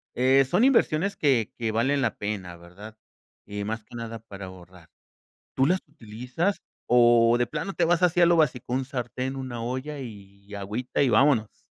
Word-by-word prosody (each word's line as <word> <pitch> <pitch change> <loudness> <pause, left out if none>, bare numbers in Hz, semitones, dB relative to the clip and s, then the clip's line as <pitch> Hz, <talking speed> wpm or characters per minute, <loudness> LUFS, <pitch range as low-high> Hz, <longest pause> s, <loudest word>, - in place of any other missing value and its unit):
eh, 130 +2 +4
son 180 - +1
inversiones 200 - +2
que 130 -8 +1
que 115 -2 -2
valen 135 +5 +1
la 120 - 0
pena, 100 -4 -5
¿verdad?, 95 +6 -13 0.5
y 105 0 -5
más 110 0 -4
que 120 - -14
nada 115 -1 -6
para 100 -3 -10
ahorrar, 90 -2 -14 0.7
¿tú 135 - +4
las 185 +4 +1
utilizas 125 - -4 0.3
o 120 -1 +5
de 120 - +1
plano 160 +9 -4
te 170 - +1
vas 175 +1 +2
así 180 0 +3
a - - +7
lo 175 - +4
básico, 125 -5 0
un 130 +1 0
sartén, 130 0 -4
una 125 -3 -5
olla 130 +5 -4
y 100 -3 -12
agüita 105 +6 -3
y 140 - +4
vámonos? 115 -2 +2
120 Hz, 180 wpm, -26 LUFS, 105-140 Hz, 0.7 s, a